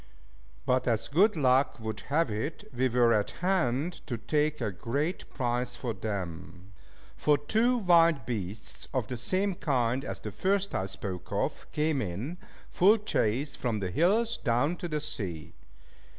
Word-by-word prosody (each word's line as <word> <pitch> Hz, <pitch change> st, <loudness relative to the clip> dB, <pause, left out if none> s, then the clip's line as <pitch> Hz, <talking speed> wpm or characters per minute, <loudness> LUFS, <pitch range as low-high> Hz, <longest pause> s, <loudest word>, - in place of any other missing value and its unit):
But 130 Hz, 0 st, +1 dB
as 115 Hz, -3 st, +1 dB
good 195 Hz, +8 st, +4 dB
luck 135 Hz, -3 st, +3 dB
would 110 Hz, -2 st, -4 dB
have 150 Hz, -3 st, +2 dB
it, 125 Hz, +10 st, -4 dB
we 130 Hz, +1 st, +2 dB
were 120 Hz, -1 st, +4 dB
at 105 Hz, -2 st, +1 dB, 0.2 s
hand 170 Hz, -2 st, +1 dB
to 120 Hz, -5 st, -2 dB
take 150 Hz, +5 st, 0 dB
a 105 Hz, -, -1 dB
great 140 Hz, -, -2 dB
prize 125 Hz, -1 st, -1 dB
for 120 Hz, -1 st, -3 dB
them; 95 Hz, -2 st, -6 dB, 0.4 s
for 150 Hz, -1 st, +3 dB
two 225 Hz, -, +2 dB
wild 170 Hz, -, +4 dB
beasts, 105 Hz, -3 st, -5 dB
of 130 Hz, -4 st, +1 dB
the 125 Hz, -, -5 dB
same 190 Hz, -, 0 dB
kind 130 Hz, -5 st, 0 dB
as -, -, -5 dB
the -, -, -6 dB
first 200 Hz, +1 st, 0 dB
I 95 Hz, -, -1 dB
spoke 95 Hz, -2 st, -6 dB
of, -, -, -2 dB
came 150 Hz, -2 st, +1 dB
in, 110 Hz, -, -4 dB, 0.3 s
full 205 Hz, +5 st, +5 dB
chase 140 Hz, -, 0 dB
from 115 Hz, -4 st, -1 dB
the 95 Hz, -2 st, -3 dB
hills 215 Hz, -, +2 dB
down 135 Hz, +6 st, +1 dB
to 175 Hz, -, -4 dB
the 155 Hz, -2 st, -2 dB
sea. 100 Hz, -, -4 dB
130 Hz, 160 wpm, -29 LUFS, 110-165 Hz, 0.4 s, full